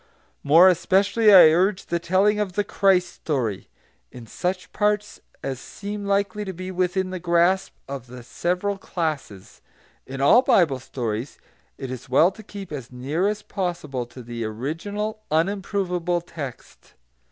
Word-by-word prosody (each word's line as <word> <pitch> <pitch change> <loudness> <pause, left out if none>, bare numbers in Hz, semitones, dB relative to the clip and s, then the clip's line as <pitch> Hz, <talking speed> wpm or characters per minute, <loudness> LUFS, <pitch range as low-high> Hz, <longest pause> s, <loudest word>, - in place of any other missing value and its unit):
More 165 +6 +7
especially 200 +4 +3
I 180 -5 +9
urge 185 +3 +1
the 170 - -1
telling 195 +5 +2
of 200 -3 -2
the 205 +2 0
Christ 190 -3 +2
story, 120 - -3 0.4
in 120 - -11
such 180 +7 -4
parts 210 0 0 0.2
as 135 -2 -3
seem 205 +7 -7
likely 200 +1 0
to 190 -2 -5
be 185 +2 -6
within 185 +1 -1
the 185 - -4
grasp 175 +2 +2
of 135 -3 -7
the 125 0 -10
several 180 +9 -2
classes. 155 - -5 0.5
In 135 +1 -7
all 145 - +6
Bible 160 - +3
stories 125 -2 -4 0.4
it 135 -2 -6
is 125 0 -8
well 160 +8 +5
to 220 - -13
keep 200 -3 -9
as 135 -5 -7
near 140 +9 -1
as 210 0 -2
possible 150 - -4
to 125 +1 -11
the 120 0 -5
original 170 - -4
unimprovable 180 0 0
text. 140 -8 -9
175 Hz, 150 wpm, -23 LUFS, 135-195 Hz, 0.5 s, I